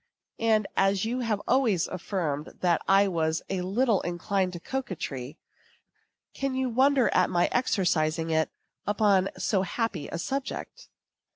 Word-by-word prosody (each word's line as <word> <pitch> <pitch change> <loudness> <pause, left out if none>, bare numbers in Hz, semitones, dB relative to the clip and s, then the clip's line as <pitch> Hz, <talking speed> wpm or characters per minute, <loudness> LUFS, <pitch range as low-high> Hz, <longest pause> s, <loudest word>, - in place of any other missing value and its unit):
And 220 -2 +3
as 195 +1 +2
you 245 +3 -1
have 220 -4 -1
always 230 -9 +2
affirmed 170 -5 -3
that 175 -2 +2
I 195 +1 +5
was 160 -3 0
a 190 -2 -1
little 210 +4 +1
inclined 185 +2 -1
to 175 - -6
coquetry, 165 - -5 1.0
can 275 -1 -2
you 260 -1 0
wonder 265 +1 +3
at 185 - +3
my 175 0 +2
exercising 165 -9 +1
it 160 0 +2 0.4
upon 205 -2 +3
so 195 -4 +1
happy 195 -4 -2
a - - -5
subject? 275 - -5
195 Hz, 135 wpm, -27 LUFS, 175-230 Hz, 1.0 s, I